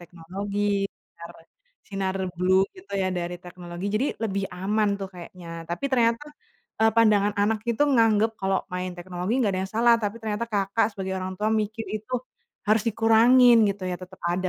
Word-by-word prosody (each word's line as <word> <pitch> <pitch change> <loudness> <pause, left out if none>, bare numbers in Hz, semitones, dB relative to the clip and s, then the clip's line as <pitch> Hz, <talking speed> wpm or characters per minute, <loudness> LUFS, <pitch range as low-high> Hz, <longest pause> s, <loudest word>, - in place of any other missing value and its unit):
teknologi, 180 +4 -6 0.6
nar 170 0 -9 0.5
sinar 195 -1 -2 0.2
blue 185 +2 +3
gitu 370 +1 -15
ya, 185 - +1
dari 175 0 -4
teknologi. 175 0 -8
Jadi 250 +7 +1 0.2
lebih 200 -3 -1
aman 205 +4 0
tuh, 195 - -4
kayaknya. 175 0 -11 0.2
Tapi 175 +11 -3
ternyata, 240 0 +2 0.6
eee, 225 - +6
pandangan 210 -3 +4
anak 220 +1 +1
itu 235 +5 +1
nganggap, 225 -2 +4
kalau 190 0 +1 0.2
main 180 0 -3
teknologi 180 +3 -4
nggak 215 -6 +2
ada 185 - -1
yang 190 - -5
salah. 235 +1 +5
Tapi 205 +1 -2
ternyata 215 0 -2
Kakak 200 +1 +1
sebagai 190 -2 -4
orang 185 0 -4
tua 210 - 0
mikir, 220 +2 -4
itu 215 +4 -7 0.5
harus 215 +1 +3
dikurangin 230 +3 +6
gitu 195 -1 -5
ya, - - -1
tetep 185 +1 -11
ada 185 +2 0
200 Hz, 170 wpm, -25 LUFS, 185-225 Hz, 0.6 s, eee